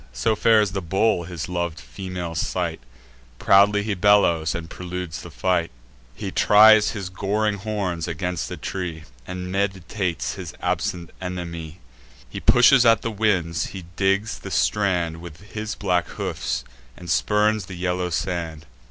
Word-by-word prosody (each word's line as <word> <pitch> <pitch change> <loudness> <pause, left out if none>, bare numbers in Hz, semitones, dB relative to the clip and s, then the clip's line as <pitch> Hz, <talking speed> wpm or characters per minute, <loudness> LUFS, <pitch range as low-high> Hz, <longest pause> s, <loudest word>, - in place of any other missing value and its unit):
So 65 - +1
fares 105 -2 +4
the 95 0 -3
bull 95 +1 +1
in - - -10
his 85 -2 -5
lov'd 85 -3 -3
female's 85 +6 -5
sight: - - -2 0.6
Proudly 100 +4 +4
he 105 0 -1
bellows, 90 -5 +3
and 85 -1 -5
preludes 90 -1 -6
the - - -10
fight; 90 -3 0 0.5
He - - -5
tries 110 0 +6
his 95 -3 -4
goring 100 +2 -1
horns 95 -5 -3
against 90 +1 -3
a - - -6
tree, 85 -4 -5 0.2
And 90 0 -5
meditates 95 - -2
his - - -8
absent 90 -5 -2
enemy; 85 -3 -6 0.5
He - - -7
pushes 125 +1 +6
at 115 -1 +4
the 115 - -2
winds; 95 -6 0
he 90 - -8
digs 100 +3 0
the - - -8
strand 85 +2 0
With 85 +4 -12
his 105 0 -4
black 90 -3 0
hoofs, - - -3 0.3
and 90 - -11
spurns 105 +3 +2
the 95 - -7
yellow 90 0 -1
sand. 85 -3 -3
90 Hz, 150 wpm, -23 LUFS, 85-105 Hz, 0.6 s, tries